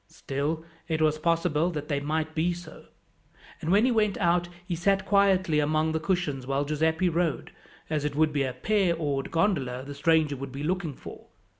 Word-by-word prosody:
Still, 150 Hz, +4 st, -3 dB, 0.2 s
it 160 Hz, -1 st, -1 dB
was 155 Hz, -1 st, +2 dB
possible 165 Hz, 0 st, +1 dB
that 150 Hz, -4 st, -5 dB
they 145 Hz, -2 st, 0 dB
might 155 Hz, +2 st, -2 dB
be 165 Hz, +3 st, +1 dB
so; 175 Hz, +1 st, -11 dB, 0.8 s
and 160 Hz, -, -1 dB
when 205 Hz, +5 st, +5 dB
he 255 Hz, -, +3 dB
went 210 Hz, -3 st, +2 dB
out 175 Hz, -1 st, +1 dB, 0.2 s
he 180 Hz, -, -3 dB
sat 195 Hz, +3 st, +1 dB
quietly 190 Hz, -5 st, +3 dB
among 155 Hz, +2 st, +1 dB
the 160 Hz, -, 0 dB
cushions 155 Hz, -7 st, -1 dB
while 140 Hz, +1 st, 0 dB
Giuseppi 160 Hz, +4 st, +1 dB
rowed, 170 Hz, -3 st, -1 dB, 0.4 s
as 155 Hz, -2 st, -1 dB
it 145 Hz, -1 st, -2 dB
would 155 Hz, 0 st, +2 dB
be 145 Hz, -, +1 dB
a 130 Hz, -1 st, 0 dB
pair 195 Hz, -2 st, +1 dB
oared 145 Hz, -4 st, -2 dB
gondola 145 Hz, -9 st, 0 dB
the 145 Hz, -, -7 dB
stranger 155 Hz, 0 st, +2 dB
would 135 Hz, 0 st, -7 dB
be 140 Hz, +2 st, -6 dB
looking 170 Hz, -3 st, -2 dB
for. -, -, -11 dB
160 Hz, 190 wpm, -27 LUFS, 145-175 Hz, 0.8 s, when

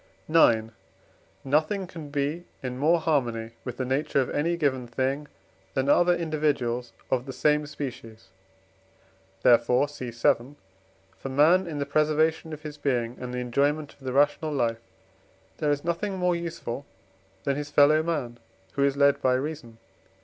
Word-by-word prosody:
IX. 115 Hz, -9 st, +4 dB, 0.7 s
Nothing 155 Hz, +8 st, +1 dB
can 165 Hz, -5 st, -9 dB
be 145 Hz, +4 st, -2 dB, 0.2 s
in 125 Hz, 0 st, -4 dB
more 165 Hz, +4 st, +4 dB
harmony 120 Hz, -8 st, 0 dB
with 125 Hz, -2 st, -6 dB
the 130 Hz, -, -2 dB
nature 140 Hz, +3 st, 0 dB
of 130 Hz, -, 0 dB
any 170 Hz, +4 st, 0 dB
given 130 Hz, -6 st, 0 dB
thing 135 Hz, +4 st, -2 dB, 0.5 s
than 135 Hz, +1 st, +1 dB
other 175 Hz, +4 st, +5 dB
individuals 145 Hz, -7 st, -1 dB, 0.2 s
of 130 Hz, +1 st, 0 dB
the -, -, -4 dB
same 150 Hz, +2 st, +1 dB
species; 125 Hz, -6 st, -8 dB, 1.1 s
therefore 125 Hz, +2 st, +5 dB
(cf. 125 Hz, -5 st, 0 dB
vii.) 130 Hz, +5 st, -13 dB, 0.6 s
for 135 Hz, -, -5 dB
man 160 Hz, +7 st, +4 dB
in 155 Hz, -3 st, -5 dB
the 140 Hz, -, -1 dB
preservation 155 Hz, +2 st, +1 dB
of 155 Hz, 0 st, -8 dB
his 150 Hz, -1 st, -8 dB
being 120 Hz, -4 st, -1 dB
and 125 Hz, -1 st, -5 dB
the 125 Hz, -, -4 dB
enjoyment 140 Hz, +5 st, 0 dB
of -, -, -29 dB
the 130 Hz, -2 st, -5 dB
rational 145 Hz, +3 st, +2 dB
life 115 Hz, -5 st, 0 dB, 0.8 s
there 150 Hz, -, +1 dB
is 145 Hz, 0 st, 0 dB
nothing 180 Hz, +4 st, -2 dB
more 180 Hz, -1 st, +1 dB
useful 165 Hz, -7 st, -5 dB, 0.6 s
than 140 Hz, -, 0 dB
his 145 Hz, +1 st, -4 dB
fellow 150 Hz, +1 st, +5 dB
man 145 Hz, -8 st, -3 dB, 0.3 s
who 140 Hz, -, +1 dB
is 140 Hz, 0 st, +2 dB
led 140 Hz, 0 st, +4 dB
by 130 Hz, -1 st, +3 dB
reason. 130 Hz, -4 st, -5 dB
145 Hz, 155 wpm, -26 LUFS, 125-155 Hz, 1.1 s, other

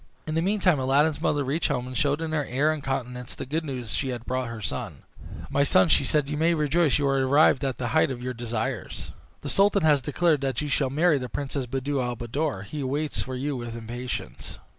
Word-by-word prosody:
In 155 Hz, -, -3 dB
the 165 Hz, -, +1 dB
meantime 185 Hz, -4 st, +2 dB
Aladdin's 145 Hz, +4 st, +2 dB
mother 145 Hz, -1 st, +1 dB
reached 145 Hz, +5 st, 0 dB
home, 125 Hz, -4 st, -1 dB
and 125 Hz, 0 st, -7 dB
showed 145 Hz, +1 st, +1 dB
in 160 Hz, -1 st, -3 dB
her 155 Hz, -2 st, 0 dB
air 140 Hz, +5 st, +1 dB
and 150 Hz, -3 st, -6 dB
countenance 125 Hz, -2 st, -4 dB
the -, -, -6 dB
good 155 Hz, +5 st, -2 dB
news 125 Hz, -6 st, -5 dB
she 130 Hz, -3 st, -1 dB
brought 130 Hz, +2 st, -3 dB
her 115 Hz, -1 st, -6 dB
son. 105 Hz, -, -5 dB, 0.5 s
"My 140 Hz, -, +3 dB
son," 95 Hz, -, +4 dB
said 135 Hz, -, +3 dB
she, -, -, -6 dB
"you 150 Hz, -, -2 dB
may 165 Hz, +1 st, +3 dB
rejoice 155 Hz, 0 st, +2 dB
you 145 Hz, -, 0 dB
are 135 Hz, 0 st, +2 dB
arrived 140 Hz, +1 st, +4 dB
at 135 Hz, -2 st, -1 dB
the 120 Hz, -2 st, -2 dB
height -, -, +3 dB
of 130 Hz, -2 st, -4 dB
your 125 Hz, +1 st, -4 dB
desires. 120 Hz, 0 st, -4 dB, 0.3 s
The -, -, -5 dB
sultan 200 Hz, -1 st, +3 dB
has 150 Hz, -3 st, +4 dB
declared 150 Hz, +2 st, +1 dB
that 135 Hz, -1 st, -1 dB
you 150 Hz, -, -3 dB
shall 135 Hz, -1 st, +1 dB
marry 155 Hz, +2 st, +3 dB
the 125 Hz, -1 st, -5 dB
Princess 140 Hz, 0 st, -3 dB
Buddir 135 Hz, +2 st, -1 dB
al 125 Hz, -1 st, -2 dB
Buddoor. 120 Hz, -1 st, -2 dB
He 145 Hz, +8 st, -5 dB
waits 145 Hz, +3 st, -2 dB
for 130 Hz, -, -5 dB
you 140 Hz, +3 st, -2 dB
with 120 Hz, -2 st, -5 dB
impatience." 120 Hz, -, -6 dB
135 Hz, 225 wpm, -26 LUFS, 125-150 Hz, 0.5 s, son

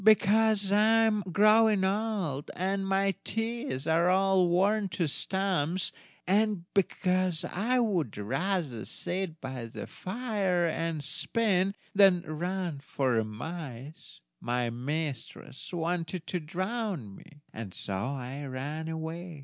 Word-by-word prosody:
"Because 215 Hz, -1 st, +4 dB
I 220 Hz, +2 st, +5 dB
am 210 Hz, -2 st, +2 dB
growing 215 Hz, +1 st, +5 dB
old, 195 Hz, -8 st, -1 dB
and 195 Hz, +2 st, -1 dB
my 195 Hz, 0 st, +2 dB
teeth 225 Hz, -, -3 dB
are 165 Hz, +2 st, +3 dB
all 190 Hz, -1 st, +4 dB
worn 195 Hz, +4 st, +2 dB
to 170 Hz, 0 st, -1 dB
stumps, 185 Hz, +1 st, 0 dB, 0.3 s
and 205 Hz, -1 st, +2 dB
because 185 Hz, -3 st, +1 dB
I 230 Hz, +7 st, 0 dB
would 185 Hz, -, 0 dB
rather 135 Hz, -, -1 dB
sit 175 Hz, -3 st, -4 dB
by 130 Hz, -3 st, -5 dB
the 115 Hz, -, -7 dB
fire 195 Hz, -4 st, -1 dB
and 165 Hz, -2 st, -1 dB
spin, 195 Hz, +5 st, +1 dB, 0.2 s
than 195 Hz, -3 st, +6 dB
run 175 Hz, 0 st, -3 dB
after 130 Hz, -4 st, 0 dB
mice, 135 Hz, +4 st, -8 dB, 0.2 s
my 120 Hz, -1 st, -1 dB
mistress 135 Hz, +1 st, -5 dB
wanted 170 Hz, 0 st, -2 dB
to 180 Hz, -, -2 dB
drown 185 Hz, -, -3 dB
me; 150 Hz, -4 st, -16 dB
and 110 Hz, -4 st, -6 dB
so 100 Hz, -, -5 dB
I 130 Hz, +6 st, -3 dB
ran 145 Hz, +5 st, -4 dB
away. 160 Hz, +1 st, -5 dB
175 Hz, 120 wpm, -29 LUFS, 145-195 Hz, 0.3 s, than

